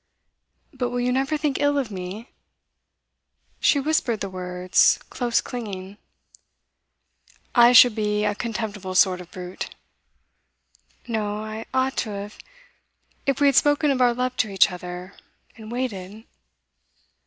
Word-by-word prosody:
'But 255 -2 -2
will 245 0 -3
you 245 +1 0
never 270 +4 0
think 295 -2 -1
ill 285 0 +2
of 260 -6 -2
me?' 190 +5 -7 1.3
She 285 - +3
whispered 275 -6 0
the 195 -2 -5
words, 180 0 +2
close 240 -2 0
clinging. 200 -5 -7 1.6
'I 240 -1 +7
should 245 -1 +8
be 210 -1 0
a 210 - +1
contemptible 210 -4 -5
sort 185 -1 +4
of 180 - -13
brute.' 180 0 -7 1.3
'No. 215 -2 -2
I 220 +1 -7
ought 260 +1 0
to 225 - -1
have. 205 0 -7 0.9
If 275 -1 +1
we 290 - +3
had 275 - +3
spoken 290 +1 +4
of 260 -2 0
our 245 -1 +4
love 250 +1 -2
to 220 - +1
each 195 -1 +4
other, 180 +1 -8 0.4
and 220 0 -11
waited. 220 -4 -5
220 Hz, 135 wpm, -24 LUFS, 195-255 Hz, 1.6 s, should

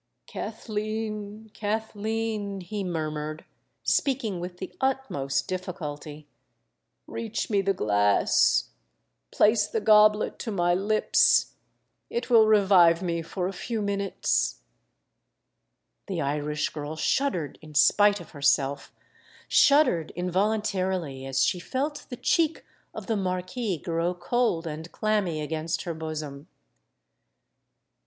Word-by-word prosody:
"Kathleen—Kathleen," 215 -1 -4
he 200 +3 -4
murmured, 155 -3 -4 0.4
speaking 240 -9 0
with 180 +1 -6
the 185 - -8
utmost 265 - -1
difficulty, 155 -5 -6 0.8
"reach 225 -2 -4
me 200 -1 +3
the 195 0 0
glass—place 105 - +1
the 225 - -1
goblet 215 0 +4
to 235 - -5
my 175 -4 +1
lips—it 215 - 0
will 225 -2 +7
revive 190 -5 +5
me 170 -2 -1
for 180 +2 -3
a 195 - -4
few 230 +4 -4
minutes——" 200 -1 -1 1.4
The 190 -5 -3
Irish 150 +1 -1
girl 150 0 -6
shuddered 175 - -1
in 155 -1 -13
spite 205 - +5
of 175 - -12
herself—shuddered 155 - +1
involuntarily 185 -6 -1
as 135 0 +1
she 180 - 0
felt 280 - -3
the 245 - -6
cheek 325 +4 +1 0.3
of - - -8
the 225 - -1
Marquis 185 +2 -2
grow 170 +2 -2
cold 180 -1 0
and 160 +1 -6
clammy 205 -7 0
against 160 +2 -3
her 170 - -3
bosom. 155 -3 -6
185 Hz, 105 wpm, -26 LUFS, 160-215 Hz, 1.4 s, will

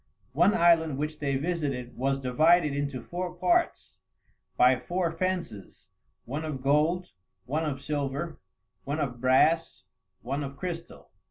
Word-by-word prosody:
One 175 - +4
island 165 -5 +4
which 150 +1 -3
they 140 -2 -1
visited 140 -5 -2
was 135 +2 0
divided 150 +4 +3
into 140 -3 -3
four 180 0 -5
parts 345 - 0 0.6
by 125 0 +5
four 175 -2 -1
fences, 165 - -4 0.4
one 145 +6 -4
of 145 -5 -5
gold, 155 +6 +2 0.3
one 155 +6 -1
of 140 -3 -3
silver, 145 +3 -3 0.4
one 145 +3 -3
of 125 -5 -3
brass, 155 +6 +3 0.4
one 140 +5 -2
of 140 0 -7
crystal. 170 -2 -7
150 Hz, 135 wpm, -28 LUFS, 135-170 Hz, 0.6 s, by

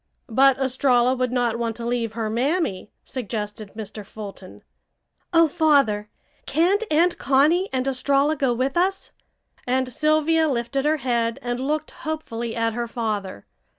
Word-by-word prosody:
"But 270 +3 +5
Estralla 255 -2 +2
would 255 -1 -1
not 240 -2 0
want 230 -1 -2
to 235 - -6
leave 235 -2 -1
her 225 -1 -2
mammy," 245 - -1
suggested 210 -4 -5
Mr. 215 -1 -7
Fulton. 200 -2 -10 0.7
"Oh, 330 -1 +5
Father! 275 -10 +2 0.4
Can't 360 +8 +2
Aunt 340 +3 +2
Connie 300 +9 +3
and 260 -1 -1
Estralla 275 +3 +2
go 270 -3 +1
with 255 +3 -1
us?" 380 +2 0 0.6
and 260 +1 +1
Sylvia 310 +4 +2
lifted 265 +1 -1
her 310 +1 +3
head 235 -4 0
and 245 0 -2
looked 295 +3 -2
hopefully 235 -8 -5
at 230 -1 0
her 240 +1 -3
father. 210 - -4
255 Hz, 145 wpm, -23 LUFS, 230-300 Hz, 0.7 s, But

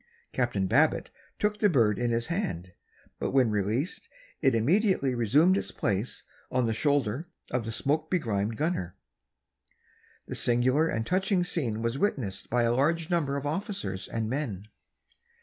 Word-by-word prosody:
Captain 120 -6 0
Babbitt 95 - +2 0.3
took 210 0 0
the 210 - +4
bird 115 - +3
in 120 0 +1
his 115 0 0
hand, 170 - -3 0.5
but - - -1
when 130 -4 +3
released 110 - -1 0.3
it 135 -6 +3
immediately 155 - +2
resumed 140 - +4
its - - -2
place 100 +3 -2 0.3
on 125 -1 +1
the 115 - 0
shoulder 140 0 +1 0.3
of 125 -2 -1
the 115 - -3
smoke 155 +7 0
begrimed 110 - -1
gunner. 150 - -2 1.3
The - - -6
singular 130 +6 +2
and 110 -6 -1
touching 185 - +1
scene 120 -11 -2
was 115 +4 -1
witnessed 130 - -1
by 120 0 +2
a 115 0 +2
large 160 +6 +1
number 145 -5 +1
of 140 - -5
officers 165 - -3
and 115 -1 -2
men. 110 -6 -3
130 Hz, 150 wpm, -28 LUFS, 110-165 Hz, 1.3 s, the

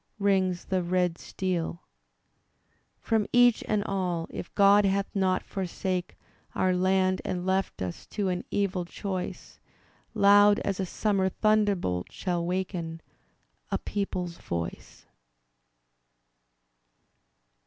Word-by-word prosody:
Rings 190 -3 +1
the 185 -1 0
red 180 -1 0
steel 175 -2 -3 0.6
— - - -47 0.5
From 220 -2 0
each 245 -1 +5
and 210 -1 +1
all, 180 -5 -1
if - - -7
God 200 0 +6
hath 195 0 +2
not 185 -1 +1
forsake 185 -1 -3 0.4
Oiu* 185 -1 +2
land 185 0 +2
and 180 0 -3
left 190 - 0
us 90 -2 -6
to 205 -2 -2
an 180 -1 -2
evil 195 -3 0
choice. 185 +1 -6 0.6
Loud 205 +1 +6
as 195 -1 -2
a 190 - -1
summer 195 -1 +1
thunderbolt 200 - +1
shall 175 -2 -2
waken 175 -2 -3 0.7
A - - 0
people's 180 -4 -3
voice. 85 -1 -6
185 Hz, 110 wpm, -28 LUFS, 180-200 Hz, 0.7 s, God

